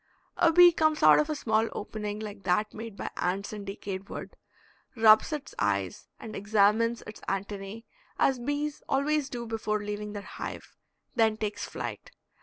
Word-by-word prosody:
A 335 - +4
bee 350 +1 +8
comes 310 -2 +1
out - - +8
of 300 - +1
a 305 - 0
small 225 -4 +1
opening, 210 0 -5
like 210 -2 -7
that 195 +3 +1
made 225 -2 -8
by - - -4
ants 195 +4 -1
in 205 -1 -6
decayed 195 0 -6
wood, - - -7 0.6
rubs 220 +3 +6
its 300 -2 -5
eyes - - -1
and 220 - -8
examines 215 +3 +2
its 215 - -10
antennae 195 +3 -4 0.3
as 265 -2 +2
bees 290 +3 -2
always 285 +1 +1
do 240 -2 -5
before 215 -2 -2
leaving 210 0 -4
their 205 -1 -6
hive, - - -7 0.4
then 225 -3 +3
takes 210 -1 -3
flight. - - -6
215 Hz, 165 wpm, -28 LUFS, 205-260 Hz, 0.6 s, bee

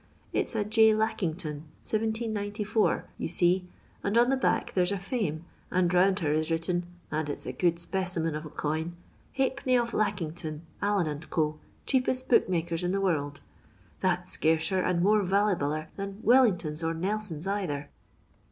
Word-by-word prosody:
It's - - 0 0.2
*J. 220 0 +6
Lackington, 165 -8 -2 0.2
1794/ 215 -1 0 0.2
you - - -1
see, 180 +2 +2 0.4
and 200 +3 +1
on 240 +2 +5
the - - +4
back 260 - 0
there 180 - +3
's 180 - 0
a 200 - 0
Fame, 185 - -2 0.2
and 180 -1 +2
round 190 +2 +4
her 150 -2 +1
is 155 +1 0
written 170 +2 -1
— - - -32
and 155 -1 -1
it 145 - -2
's - - -6
a 125 - -4
good 170 +5 +2
speciment 170 -2 -2
of 155 - -4
a 155 - -8
coin 160 +3 -2
— - - -32
* - - -28
Halfpemiy 260 -1 +2
of 235 -1 -2
Lackington, 165 -6 -2 0.2
Allen 185 -8 +1
& - - -22
Co., 155 -2 0 0.3
cheapest 255 -1 0
booksellers 170 -6 +2
in 180 +1 0
the 195 - +1
world.' 145 -7 -1 0.6
That 180 -1 +1
's - - -3
scarcer 160 +4 +1
and 180 -1 +1
more 210 +2 +4
vallyballer 180 -6 +1
than 195 0 -5
Wellingtons 185 -11 +4
or 165 0 0
Nelsons 190 -2 -3
either." 180 -8 -2
180 Hz, 170 wpm, -28 LUFS, 160-210 Hz, 0.6 s, J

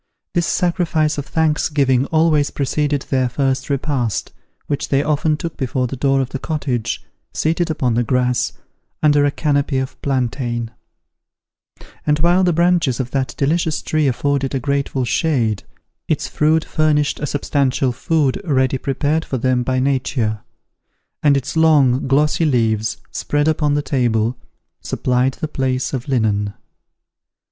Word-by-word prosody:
This 175 -1 +1
sacrifice 165 -4 +1
of 140 - -6
thanksgiving 145 -4 +1
always 155 -2 +2
preceded 145 0 -1
their 130 -2 0
first 135 +1 -1
repast, 135 -6 -1 0.3
which 145 -1 -3
they 140 0 +2
often 150 0 +1
took 170 0 -6
before 130 -1 -1
the 125 - -4
door 135 +1 +2
of 130 - -3
the 135 - -5
cottage, 135 -8 -3 0.3
seated 165 +2 0
upon 130 -6 0
the 120 - +2
grass, 125 0 +1 0.5
under 145 -1 +4
a - - +3
canopy 140 -2 0
of 130 0 -4
plantain: 120 -3 -2 1.3
and 150 0 +2
while 175 +4 +3
the 180 - +3
branches 170 -6 +2
of 130 -1 -3
that 135 -1 -2
delicious 160 +2 +1
tree 155 -2 +1
afforded 140 +1 0
a - - 0
grateful 140 -1 -1
shade, 120 - 0 0.5
its - - 0
fruit 155 +1 +1
furnished 150 -2 +1
a 150 - -2
substantial 135 -2 0
food 150 +2 0
ready 130 -5 +1
prepared 145 +4 0
for 135 - -3
them 125 +1 +1
by 130 +1 0
nature, 130 -5 0 0.8
and 145 -2 +4
its 135 - -4
long 145 -6 +4
glossy 150 +4 +2
leaves, 110 -6 +1
spread 145 +1 -1
upon 150 -2 +1
the 145 - 0
table, 120 -4 0 0.5
supplied 125 +1 0
the 155 - -4
place 130 -3 -2
of 130 +1 -3
linen. 105 -6 0
140 Hz, 145 wpm, -19 LUFS, 130-150 Hz, 1.3 s, under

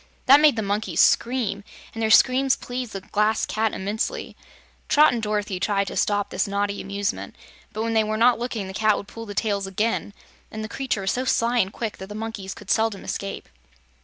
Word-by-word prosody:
That 275 +2 +8
made 300 -4 +5
the 220 - -2
monkeys 200 -4 -2
scream, 230 -5 +2 0.3
and 225 - -5
their 220 - +1
screams 260 +3 +5
pleased 245 -2 -6
the 195 - -5
Glass 210 +3 +1
Cat 220 0 0
immensely. 205 +3 -3 0.5
Trot 300 -1 +6
and 235 - -2
Dorothy 210 -3 -2
tried 200 0 +1
to - - -7
stop 205 -1 0
this - - 0
naughty 200 0 -1
amusement, 200 +2 -3 0.4
but 215 - -3
when 230 0 -1
they 220 -1 +4
were 215 0 -2
not 235 +1 +4
looking 235 -4 -3
the 190 - -7
Cat 215 +1 +2
would 200 - -7
pull 230 +1 -9
the 205 - -7
tails 200 -1 -1
again, 210 +1 -1 0.4
and 220 0 -6
the - - -4
creature 260 -4 -2
was 190 - 0
so 255 - -1
sly 240 -1 +2
and 190 -3 +1
quick 225 -1 -5
that 190 - -8
the 210 - -7
monkeys 215 -3 -5
could 200 -2 -6
seldom 220 -1 +1
escape. 195 0 -5
215 Hz, 210 wpm, -24 LUFS, 200-230 Hz, 0.5 s, That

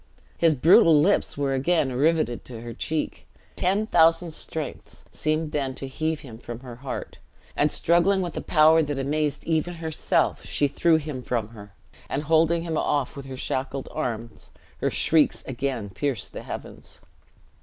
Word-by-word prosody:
His 165 -2 +3
brutal 160 +2 +6
lips 185 +1 +2
were 140 -1 0
again 140 0 +1
riveted 145 -3 +1
to 115 -3 -8
her 120 0 -7
cheek. 155 +6 -3 0.3
Ten 195 +4 +1
thousand 165 -3 +4
strengths 155 -1 -6
seemed 155 0 -1
then 135 -3 -2
to 135 - -6
heave 155 +3 -2
him 115 -7 -11
from 120 -1 -8
her 125 -3 -10
heart; 130 0 -6 0.4
and 150 0 +2
struggling 180 +3 +3
with 175 - -5
a - - -3
power 160 0 +5
that 145 -2 -2
amazed 145 +2 -1
even 165 +2 0
herself, 160 -2 0
she 145 - 0
threw 165 +4 +2
him 150 -4 -3
from 115 -4 -2
her; 105 -4 -13 0.4
and 145 - -2
holding 165 +2 +3
him 165 -2 -1
off 145 -1 -1
with 140 -1 -8
her 130 -1 -7
shackled 135 +1 -3
arms, 115 -2 -5 0.3
her - - +1
shrieks 160 -2 +2
again 125 -5 -3
pierced 135 -3 -3
the - - -6
heavens. - - -9
150 Hz, 165 wpm, -25 LUFS, 130-160 Hz, 0.4 s, brutal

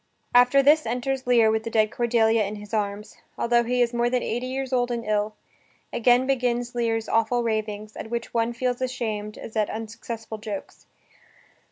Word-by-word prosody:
After 250 +3 +6
this 300 0 +5
enters 250 +2 -2
Lear 230 -3 +5
with 220 0 +1
the 230 - -4
dead 215 -1 +2
Cordelia 230 -2 +2
in 205 +1 -4
his 210 0 -11
arms, 210 -1 -3 0.2
altho 235 0 +3
he 245 +1 +2
is 235 0 -2
more 240 0 +1
than 250 0 0
eighty 240 +3 -2
years 265 0 -3
old 245 -1 +2
and 235 -1 -3
ill. 210 0 0 0.6
Again 245 +2 +4
begins 245 -2 0
Lear's 225 -2 -1
awful 230 +2 +1
ravings, 215 -1 -3
at - - -7
which 235 0 -4
one 230 0 +1
feels 245 +1 -2
ashamed 220 -5 -3
as 225 - -9
at 215 -2 +1
unsuccessful 225 0 -6
jokes. 210 -2 -7
235 Hz, 180 wpm, -25 LUFS, 220-245 Hz, 0.6 s, After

